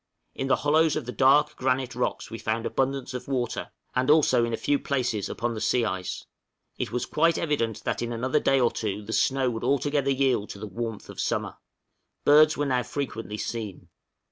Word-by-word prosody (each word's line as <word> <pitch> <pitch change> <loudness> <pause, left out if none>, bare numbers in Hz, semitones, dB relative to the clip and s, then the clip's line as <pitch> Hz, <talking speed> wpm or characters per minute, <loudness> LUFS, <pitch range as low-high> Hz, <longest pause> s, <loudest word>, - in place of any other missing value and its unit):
In 135 - -3
the - - +4
hollows 155 +1 +3
of 155 - -3
the 125 - -4
dark 145 +4 +4
granite 130 -1 0
rocks 125 0 -2
we 115 - -6
found 115 +1 -2
abundance 135 0 -1
of 125 0 -6
water, 125 -4 -2 0.2
and 130 +1 0
also 145 -5 +5
in 115 - -1
a 115 - -1
few 145 -1 +1
places 125 -7 -1
upon 120 0 -2
the 110 - -5
sea 120 -2 +2
ice; 95 -3 -4 0.5
it - - -2
was 125 - -1
quite 165 +2 +2
evident 130 -9 -1
that - - -2
in 120 0 -2
another 125 +3 0
day 135 0 +3
or 120 -2 +3
two 105 -1 -3
the 110 +2 -6
snow 130 +3 +2
would 115 -1 -5
altogether 140 0 +1
yield 130 -6 +1
to - - -7
the 110 - -5
warmth 115 +2 -5
of - - -10
summer; - - -2 0.7
birds 155 +1 +6
were 145 - 0
now 130 -3 +1
frequently 115 -4 -4
seen. 110 -4 -5
125 Hz, 200 wpm, -26 LUFS, 115-140 Hz, 0.7 s, birds